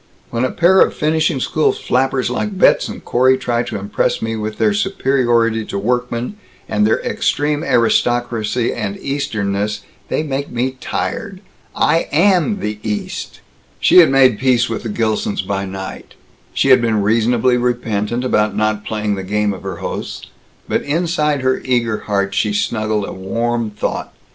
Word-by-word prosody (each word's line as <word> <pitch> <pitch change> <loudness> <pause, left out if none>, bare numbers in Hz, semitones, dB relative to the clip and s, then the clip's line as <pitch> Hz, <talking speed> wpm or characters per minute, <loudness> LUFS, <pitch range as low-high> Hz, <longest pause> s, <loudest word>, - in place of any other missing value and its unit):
When 120 +1 -1
a 130 - +1
pair 185 +3 +4
of - - +3
finishing 155 -2 +1
school 155 +4 +1
flappers 130 -1 0
like 200 +10 -2
Betz - - +4
and - - -9
Corey 130 +2 +3
try 120 -2 -1
to 120 - -4
impress 100 +1 -1
me 115 0 -3
with 110 -1 -4
their 210 - +2
superiority 120 - +1
to 100 - -4
workmen, 125 - -2 0.3
and 105 0 +2
their 110 - +2
extreme 150 +1 0
aristocracy 120 -2 +1
and 100 -3 -4
Easternness, 105 -6 -2 0.3
they - - 0
make 140 -1 -3
me 125 +2 -1
tired. 200 -5 -3 0.4
I 165 - +2
am 190 +5 +3
the 105 0 -3
East!" 105 -1 -5 0.4
She - - +6
had 170 - +7
made 130 -5 +4
peace 130 -2 +3
with 115 - -3
the 115 - -5
Gilsons 110 -2 -1
by 100 0 -2
night; 95 0 -8 0.4
she 135 - +1
had 130 -2 +7
been 110 -3 +1
reasonably 115 +3 +2
repentant 120 -1 -1
about 105 -5 +1
not 110 0 0
playing 105 -1 -2
the 95 - -3
game 105 +2 0
of 95 - -9
her 95 -1 -5
hosts; - - -6 0.4
but - - 0
inside 150 -2 0
her 130 0 +1
eager 120 -4 0
heart 100 -1 0
she 105 0 0
snuggled 110 -1 -1
a - - -6
warm 115 +4 -2
thought. 105 - -4
120 Hz, 165 wpm, -18 LUFS, 105-135 Hz, 0.4 s, had